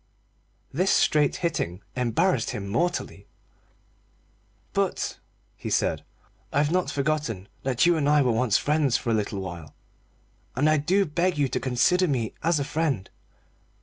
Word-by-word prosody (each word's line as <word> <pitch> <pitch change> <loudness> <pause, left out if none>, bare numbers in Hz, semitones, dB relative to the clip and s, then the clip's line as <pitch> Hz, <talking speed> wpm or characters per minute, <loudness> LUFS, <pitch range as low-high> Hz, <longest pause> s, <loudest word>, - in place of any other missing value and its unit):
This 185 +7 +1
straight 150 -2 +3
hitting 100 - -2
embarrassed 125 - +1
him 100 -1 -4
mortally. 140 - -2 1.5
"But," - - -1 0.4
he - - -6
said, - - 0 0.5
"I've 145 +2 +1
not 180 -4 +1
forgotten 140 -9 -2
that 130 +2 +1
you 175 0 +4
and 145 -2 +1
I 150 -1 +5
were 125 - +2
once 115 -1 +2
friends 150 -4 +1
for 120 - -2
a - - +2
little 105 -2 -1
while, 85 -4 -8 0.8
and 145 +4 +2
I 155 0 +4
do 190 +7 +2
beg 170 +2 0
you 145 -2 +2
to - - -1
consider 155 +9 +2
me 120 -7 -1
as 170 -2 +2
a - - 0
friend. 140 - -2
140 Hz, 150 wpm, -26 LUFS, 115-160 Hz, 1.5 s, I